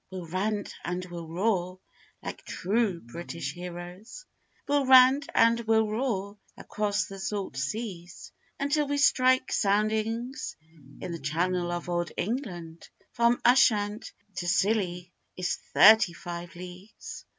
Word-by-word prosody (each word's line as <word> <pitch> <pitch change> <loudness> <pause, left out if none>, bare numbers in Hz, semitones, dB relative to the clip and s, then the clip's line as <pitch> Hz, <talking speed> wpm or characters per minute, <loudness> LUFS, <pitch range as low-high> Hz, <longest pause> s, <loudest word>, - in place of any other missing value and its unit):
We'll 185 -2 -7
rant 200 +4 -2
and 180 +1 -3
we'll 170 -2 -8
roar 185 +1 -1 0.4
like - - -7
true 200 -2 -1
British 150 +2 -6
heroes, 180 - -9 0.4
We'll 285 -2 +1
rant 260 +3 +7
and 230 +1 +5
we'll 220 -1 +2
roar 210 -3 -2 0.2
across 205 -1 -1
the 195 0 -9
salt 195 -5 -4
seas, 175 - -5 0.3
Until 285 +1 +1
we 285 0 -1
strike 260 -2 +3
soundings 220 +5 0 0.4
in 180 - -5
the 170 - -5
channel 175 +4 -1
of 175 0 -4
old 175 -1 -1
England; 175 - -4 0.2
From 235 +1 +2
Ushant 215 -4 +3 0.3
to 175 - -3
Scilly 185 -2 0 0.3
is 180 0 -1
thirty 210 -3 +7
five 175 +1 -8
leagues. 180 +4 -10
195 Hz, 125 wpm, -28 LUFS, 175-230 Hz, 0.4 s, rant